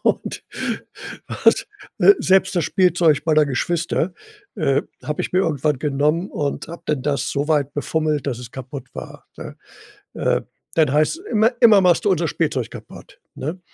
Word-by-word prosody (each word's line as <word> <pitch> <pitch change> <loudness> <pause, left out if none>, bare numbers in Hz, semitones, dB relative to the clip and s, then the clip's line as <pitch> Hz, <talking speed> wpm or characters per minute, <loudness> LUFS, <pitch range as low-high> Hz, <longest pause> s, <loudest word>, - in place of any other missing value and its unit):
Und - - -1 0.8
was, - - +2 0.3
äh, 405 - +8
selbst 190 +1 +3
das 165 - +2
Spielzeug 175 -5 +3
meiner 155 -2 +4
Geschwister, 165 +5 -1 0.4
äh, 140 -5 +1 0.2
habe 150 - -2
ich - - -5
mir 185 - +3
irgendwann 150 -4 0
genommen 150 +5 0
und 145 0 -3
habe 170 - -9
dann 145 -4 -1
das 140 -2 -1
so 145 +1 -1
weit 145 -3 +1
befummelt, 150 0 -1
dass 125 -4 -2
es 120 - -9
kaputt 130 0 -9
war, - - -9
ne? - - -8 0.6
Äh, - - 0 0.3
dann 155 -4 +3
heißt 155 - +2
es: 375 - -15
„Immer 220 +3 +4
immer 220 -4 +7
machst 180 +1 +3
du - - +4
unser 170 -2 +1
Spielzeug 140 -8 -1
kaputt.“ - - -12
Ne? 160 +7 -5
155 Hz, 165 wpm, -21 LUFS, 140-175 Hz, 0.8 s, äh